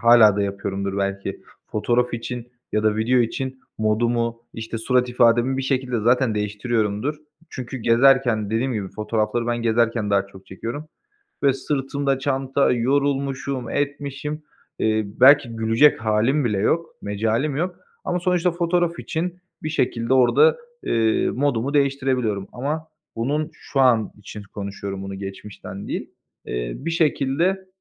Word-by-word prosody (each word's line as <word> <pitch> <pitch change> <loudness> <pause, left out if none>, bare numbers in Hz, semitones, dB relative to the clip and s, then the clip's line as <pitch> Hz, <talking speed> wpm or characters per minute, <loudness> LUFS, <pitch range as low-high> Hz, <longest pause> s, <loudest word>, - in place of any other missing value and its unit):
hâlâ 115 -3 +7
da 100 - +1
yapıyorumdur 100 0 -3
belki. 100 0 -3 0.2
Fotoğraf 120 +3 0
için 120 +1 -6 0.2
ya 105 - +1
da 110 0 +2
video 120 +4 +2
için 130 +3 -2 0.2
modumu, 115 +2 0
işte, 115 0 -5
surat 125 +2 +1
ifademi 120 +1 +3
bir 135 - -1
şekilde 130 -3 -1
zaten 120 0 +3
değiştiriyorumdur. 105 +4 -1 0.4
Çünkü 130 0 -6
gezerken, 120 -2 +3
dediğim 125 +4 0
gibi, 100 -4 -3
fotoğrafları 110 +3 -1
ben 120 - 0
gezerken 115 -2 +1
daha 100 -1 +2
çok 95 -1 -15
çekiyorum 115 +10 -6 0.5
ve 140 -1 +5
sırtımda 135 0 -1
çanta, 135 0 +1
yorulmuşum, 135 0 0
etmişim. 145 +1 -3 0.4
Eee, 110 0 +2
belki 130 +3 +5
gülecek 115 +6 +4
hâlim 115 +7 +2
bile 105 -5 0
yok, 165 +11 +1 0.2
mecalim 110 +8 -1
yok 180 +4 -2 0.3
ama 180 - -1
sonuçta 180 0 +2
fotoğraf 170 0 0
için 175 +2 -3 0.2
bir 155 - -2
şekilde 125 -5 0
orada, 450 - +5 0.3
eee, 110 -1 +1
modumu 140 0 0
değiştirebiliyorum 130 -8 +1
ama 150 +5 -3 0.3
bunun 150 +7 -1
şu 135 - -3
an 120 -5 +3
için 105 +1 -9
konuşuyorum, 100 -1 -5
bunu 95 0 -6
geçmişten 95 0 -8
değil. - - -4 0.4
Eee, - - -3
bir 165 +5 -4
şekilde 165 +4 +1
120 Hz, 135 wpm, -22 LUFS, 110-140 Hz, 0.5 s, hâlâ